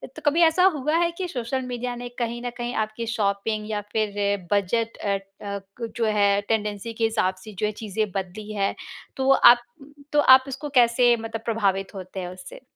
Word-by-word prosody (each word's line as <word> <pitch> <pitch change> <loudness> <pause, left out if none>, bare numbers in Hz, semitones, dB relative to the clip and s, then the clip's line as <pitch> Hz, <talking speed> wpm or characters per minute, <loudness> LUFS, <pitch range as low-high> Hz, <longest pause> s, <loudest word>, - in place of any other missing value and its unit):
तो - - -9
कभी 300 +4 +3
ऐसा 330 +2 +4
हुआ 300 +2 -1
है 340 0 +2
कि 370 - -2
सोशल 260 -3 -3
मीडिया 245 0 -4
ने 245 0 -7
कहीं 235 0 -2
न - - -1
कहीं 240 0 -3
आपकी 215 +2 -4
शॉपिंग 210 0 -1
या 210 -1 -2
फिर 205 -2 0
बजट 225 +3 0
अ, 200 -1 -1 0.3
क 200 +3 -6
जो 230 - +1
है 205 -2 +3
टेंडेंसी 215 0 -1
के 225 - -3
हिसाब 205 -4 +1
से 215 - -10
जो - - +1
है 210 - 0
चीज़ें 215 0 -2
बदली 195 +3 -5
है, 195 -1 0 0.4
तो 265 0 0
आप 240 -2 +7 0.5
तो 295 - +4
आप 260 -2 +7
इसको 275 +2 -5
कैसे 240 0 +5
मतलब 225 0 -6
प्रभावित 195 -4 0
होते 185 0 -7
हैं 180 - -4
उससे? 185 - -11
225 Hz, 195 wpm, -24 LUFS, 200-245 Hz, 0.5 s, आप